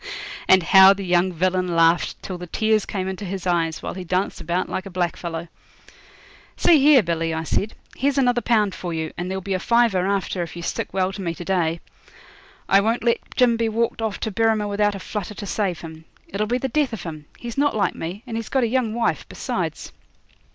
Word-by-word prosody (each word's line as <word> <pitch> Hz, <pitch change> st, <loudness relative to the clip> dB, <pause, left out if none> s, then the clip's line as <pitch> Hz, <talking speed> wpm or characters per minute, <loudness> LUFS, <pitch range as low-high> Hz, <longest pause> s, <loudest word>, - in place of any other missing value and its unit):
And 190 Hz, -1 st, +6 dB
how 190 Hz, +4 st, +8 dB
the 195 Hz, -1 st, -6 dB
young 180 Hz, +1 st, +2 dB
villain 180 Hz, 0 st, 0 dB
laughed 165 Hz, +1 st, +3 dB
till 185 Hz, -2 st, -5 dB
the 180 Hz, -, -7 dB
tears 215 Hz, +3 st, +1 dB
came 190 Hz, -2 st, -3 dB
into 190 Hz, +2 st, -5 dB
his 190 Hz, -1 st, -5 dB
eyes, 165 Hz, -3 st, 0 dB
while -, -, -4 dB
he 185 Hz, -, -6 dB
danced 185 Hz, +2 st, -1 dB
about 175 Hz, +3 st, -1 dB
like 190 Hz, -, -4 dB
a -, -, -7 dB
blackfellow. 170 Hz, -2 st, -3 dB, 1.1 s
'See 325 Hz, -4 st, +5 dB
here, 275 Hz, -3 st, +6 dB
Billy,' 165 Hz, -1 st, -1 dB
I 160 Hz, -, -2 dB
said, 200 Hz, +6 st, -1 dB, 0.2 s
'here's 280 Hz, +1 st, 0 dB
another 245 Hz, -2 st, +3 dB
pound 210 Hz, -5 st, +2 dB
for 175 Hz, -2 st, -5 dB
you, 160 Hz, -1 st, -3 dB
and 175 Hz, +1 st, -4 dB
there'll 190 Hz, 0 st, -4 dB
be 195 Hz, -, -2 dB
a 185 Hz, -, 0 dB
fiver 225 Hz, -4 st, +2 dB
after 195 Hz, -2 st, -1 dB
if 170 Hz, -, -5 dB
you 170 Hz, -, -7 dB
stick -, -, -3 dB
well 190 Hz, 0 st, 0 dB
to 200 Hz, -, -6 dB
me 170 Hz, -2 st, -3 dB
to 175 Hz, -, -8 dB
day. 170 Hz, -3 st, 0 dB, 0.9 s
I 195 Hz, +1 st, +5 dB
won't 225 Hz, +3 st, 0 dB
let 235 Hz, -1 st, +2 dB, 0.2 s
Jim 245 Hz, -3 st, +4 dB
be 230 Hz, -1 st, 0 dB
walked 230 Hz, +1 st, -1 dB
off 220 Hz, -2 st, -2 dB
to 220 Hz, -, -2 dB
Berrima 220 Hz, 0 st, +1 dB
without 205 Hz, 0 st, +1 dB
a -, -, -6 dB
flutter 210 Hz, +1 st, -5 dB
to 205 Hz, -, -6 dB
save 195 Hz, -4 st, -2 dB
him. 160 Hz, -1 st, -10 dB, 0.2 s
It'll 210 Hz, +2 st, -2 dB
be 245 Hz, +3 st, +1 dB
the 265 Hz, -, -2 dB
death 275 Hz, -1 st, 0 dB
of 225 Hz, -, -5 dB
him. 155 Hz, -3 st, -7 dB
He's 235 Hz, -1 st, -7 dB
not 285 Hz, -2 st, +1 dB
like 200 Hz, -4 st, +1 dB
me, 180 Hz, +7 st, -6 dB
and 230 Hz, -3 st, -4 dB
he's 230 Hz, -, -5 dB
got 265 Hz, -2 st, +1 dB
a -, -, +2 dB
young 230 Hz, -2 st, 0 dB
wife 235 Hz, -1 st, -1 dB
besides.' -, -, -4 dB
195 Hz, 220 wpm, -22 LUFS, 175-225 Hz, 1.1 s, how